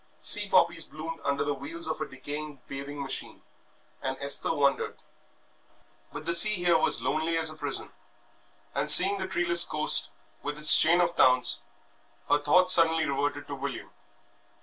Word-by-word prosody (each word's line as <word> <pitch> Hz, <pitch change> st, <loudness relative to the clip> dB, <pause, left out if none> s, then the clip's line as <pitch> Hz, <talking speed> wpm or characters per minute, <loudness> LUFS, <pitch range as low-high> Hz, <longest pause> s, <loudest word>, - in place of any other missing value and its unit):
Sea -, -, +5 dB
poppies -, -, 0 dB
bloomed 165 Hz, +1 st, -10 dB
under 140 Hz, 0 st, -3 dB
the 145 Hz, -, -4 dB
wheels 150 Hz, +5 st, -8 dB
of 160 Hz, -1 st, -6 dB
a 155 Hz, -, -5 dB
decaying 145 Hz, +2 st, -10 dB
bathing 140 Hz, +1 st, -8 dB
machine, 135 Hz, -, -6 dB, 0.6 s
and 130 Hz, 0 st, -6 dB
Esther 140 Hz, 0 st, +1 dB
wondered. 140 Hz, -3 st, -2 dB, 1.1 s
But 150 Hz, +1 st, -10 dB
the 170 Hz, -, -2 dB
sea 210 Hz, +5 st, +7 dB
here 175 Hz, -2 st, 0 dB
was 160 Hz, -, -1 dB
lonely 160 Hz, +2 st, -3 dB
as 160 Hz, -1 st, 0 dB
a -, -, -12 dB
prison, 145 Hz, -3 st, -3 dB, 0.8 s
and, -, -, -4 dB
seeing 195 Hz, +2 st, +7 dB
the 190 Hz, -, -5 dB
treeless 170 Hz, -2 st, +3 dB
coast 105 Hz, -9 st, 0 dB, 0.3 s
with 145 Hz, 0 st, -7 dB
its 150 Hz, 0 st, +5 dB
chain 170 Hz, +3 st, +2 dB
of 170 Hz, 0 st, -3 dB
towns, 125 Hz, -1 st, +1 dB, 0.7 s
her 145 Hz, -, +1 dB
thoughts 180 Hz, +5 st, +3 dB
suddenly 165 Hz, -2 st, +2 dB
reverted 145 Hz, +1 st, -5 dB
to -, -, -10 dB
William. 140 Hz, -1 st, -8 dB
155 Hz, 160 wpm, -25 LUFS, 140-170 Hz, 1.1 s, sea